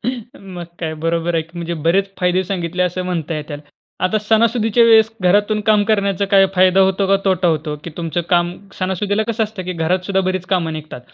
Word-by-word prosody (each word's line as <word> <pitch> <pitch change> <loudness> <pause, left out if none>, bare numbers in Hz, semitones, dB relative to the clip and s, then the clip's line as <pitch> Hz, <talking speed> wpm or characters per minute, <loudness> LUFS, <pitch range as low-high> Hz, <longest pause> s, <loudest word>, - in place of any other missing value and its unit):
मग 210 -7 -6 0.2
काय 160 -2 -3
बरोबर 165 +2 -1
आहे 165 - +1
की. 160 - -21
म्हणजे 170 0 -3
बरेच 195 +3 +2
फायदे 180 +1 +2
सांगितले 180 -1 -2
असं 180 0 -1
म्हणता 170 -3 -3
येईल. 150 -1 -6 0.4
आता 185 +4 +1
सणासुदीच्या 225 +1 +2
वेळेस 225 -1 +5
घरातून 205 +4 +2
काम 215 -1 +4
करण्याचा 200 -2 +1
काय 195 -1 +5
फायदा 185 +1 +4
होतो 190 +1 +2
का 195 +1 +4
तोटा 185 -2 +2
होतो, 155 -2 -1
की 170 - -6
तुमचं 165 -1 -2
काम 175 0 +2 0.3
सणासुदीला 195 +3 -1
कसं 225 -1 0
असतं 210 -3 -7
की 185 - -3
घरात 175 +2 -1
सुद्धा 195 -1 +1
बरीच 185 -1 -3
काम 180 -4 0
निघतात. 155 -4 -7
185 Hz, 195 wpm, -18 LUFS, 170-205 Hz, 0.4 s, वेळेस